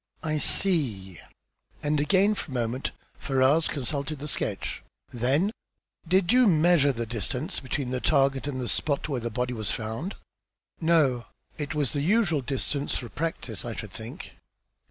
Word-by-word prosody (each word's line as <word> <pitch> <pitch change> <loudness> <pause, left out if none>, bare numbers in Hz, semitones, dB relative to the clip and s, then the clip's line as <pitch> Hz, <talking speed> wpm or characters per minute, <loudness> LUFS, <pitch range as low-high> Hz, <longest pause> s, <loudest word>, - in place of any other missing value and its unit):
"I 155 -1 0
see." 115 - +2 0.6
And 150 0 +1
again 195 +7 +4
for 195 - -6
a 130 - -6
moment 120 +2 -1 0.3
Ferrars 135 +4 +3
consulted 140 +2 -3
the 145 +2 -6
sketch. - - -2 0.3
Then 135 - +2 0.6
"Did 185 +3 +3
you 250 -1 +6
measure 160 -4 +5
the 115 -2 -3
distance 125 - -3
between 130 -1 -3
the 130 - -1
target 135 -2 +2
and 135 -3 -3
the 125 - -3
spot 145 +3 -1
where 135 -4 -1
the 120 - -2
body 125 +2 -2
was 110 -3 -3
found?" 115 - -3 0.6
"No. 155 -8 +3 0.3
It 150 +1 -3
was 145 -4 0
the 145 - 0
usual 175 -3 +2
distance 140 +2 -2
for 120 - -6
practice, 150 -8 -3
I 120 -2 -5
should 110 - -7
think." 110 +4 -8
140 Hz, 155 wpm, -27 LUFS, 125-160 Hz, 0.6 s, you